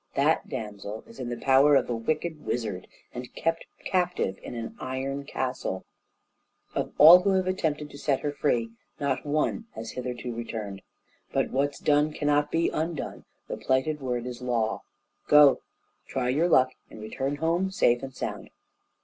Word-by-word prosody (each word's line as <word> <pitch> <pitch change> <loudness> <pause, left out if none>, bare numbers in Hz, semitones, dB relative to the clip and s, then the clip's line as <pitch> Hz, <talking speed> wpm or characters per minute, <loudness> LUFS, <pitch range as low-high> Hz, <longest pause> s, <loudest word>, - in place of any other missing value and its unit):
That - - +2
damsel 105 0 -6
is 115 - -15
in 125 -2 -4
the 120 - -3
power 135 +2 +5
of - - +3
a 120 - -1
wicked 155 +6 -2
wizard, 105 -6 -3 0.3
and 125 0 -7
kept 165 0 -1 0.2
captive 180 - 0
in - - -7
an 115 -1 -6
iron 135 +2 -3
castle; 125 -9 -3 0.9
of - - -2
all 165 +4 +10
who 195 +1 +2
have 190 -1 +2
attempted 155 -5 -1
to 140 - -10
set 140 -3 0
her 145 - -1
free, 120 -6 0 0.3
not 140 0 -1
one 155 +9 0
has 110 0 -6
hitherto 125 -1 -5
returned. 110 -4 -5 0.5
But - - 0
what's 140 +1 0
done 150 +1 +2
cannot 145 0 +1
be 165 +2 +1
undone; 160 0 -4 0.2
the - - -4
plighted 135 +3 0
word 125 -2 -2
is 125 0 -6
a - - -6
law. 115 -3 0 0.5
Go! 150 -2 +7 0.5
try 125 -2 -1
your 155 +7 +2
luck, 130 -5 +5 0.2
and - - -11
return 130 +6 -3
home 170 +5 0
safe 120 -11 +2
and 135 -1 -7
sound!" - - -5
135 Hz, 165 wpm, -27 LUFS, 120-150 Hz, 0.9 s, all